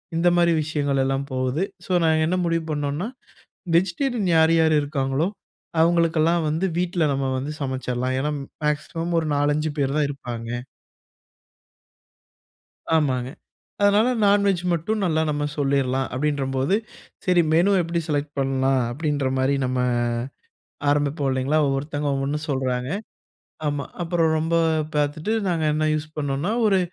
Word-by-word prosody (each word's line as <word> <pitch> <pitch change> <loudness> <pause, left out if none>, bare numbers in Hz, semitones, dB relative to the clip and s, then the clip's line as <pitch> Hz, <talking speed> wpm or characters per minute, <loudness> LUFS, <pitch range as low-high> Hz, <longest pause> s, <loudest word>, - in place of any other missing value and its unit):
இந்த 170 +2 +2
மாரி 170 0 +4
விஷயங்கள் 145 -3 -1
எல்லாம் 135 +1 0
போவுது. 130 +6 0 0.2
ஸோ - - -7
நாங்க 160 -1 +3
என்ன 180 - +1
முடிவு 165 -1 0
பண்ணோம்னா, 145 +5 -2 0.7
வெஜிடேரியன் 200 +4 0
யார் 160 0 +5
யாரு 160 -1 +4
இருக்காங்களோ, 140 +1 -1 0.5
அவங்களுக்கெல்லாம் 165 0 +3
வந்து 160 +5 0
வீட்ல 175 -1 0
நம்ம 135 0 -1
வந்து 145 +4 -4
சமைச்சிரலாம். 130 -1 -2
ஏன்னா, 150 +2 -1 0.3
மேக்ஸிமம் 165 +3 -1
ஒரு 160 - -3
4 145 +1 +2
5 155 0 -1
பேரு 135 -1 +1
தான் 150 - +3
இருப்பாங்க. 120 -4 -6 2.5
ஆமாங்க. 130 -5 +1 0.5
அதனால 205 +3 +4 0.2
நான்வெஜ் 200 -3 +3
மட்டும் 200 +6 -1
நல்லா 160 -3 +1
நம்ம 145 0 -1
சொல்லிரலாம் 135 -2 +1
அப்டின்றம்போது, 135 +2 0 0.5
சரி 180 -2 +4
மெனு 175 +5 +4
எப்படி 170 0 -2
செலக்ட் 145 -1 -1
பண்ணலாம் 135 0 +1
அப்டின்ற 145 0 -1
மாரி 130 +2 +2
நம்ம 130 0 -1 1.1
ஆரம்பிப்போம், 145 -1 +1
இல்லைங்களா? 130 +4 +1
ஒவ்வொருத்தங்க 145 +2 -2
ஒவ்வொண்ணு 135 +2 -1
சொல்றாங்க. 130 -2 -1 0.8
ஆமா. 145 -1 -1 0.2
அப்பறம் 165 -2 +1
ரொம்ப 165 +2 -1 0.4
பார்த்துட்டு 150 +7 0 0.2
நாங்க 165 -3 0
என்ன 155 0 0
யூஸ் 155 0 -4
பண்ணோம்னா, 145 +7 -1
ஒரு 195 -2 +4
150 Hz, 130 wpm, -23 LUFS, 135-165 Hz, 2.5 s, யார்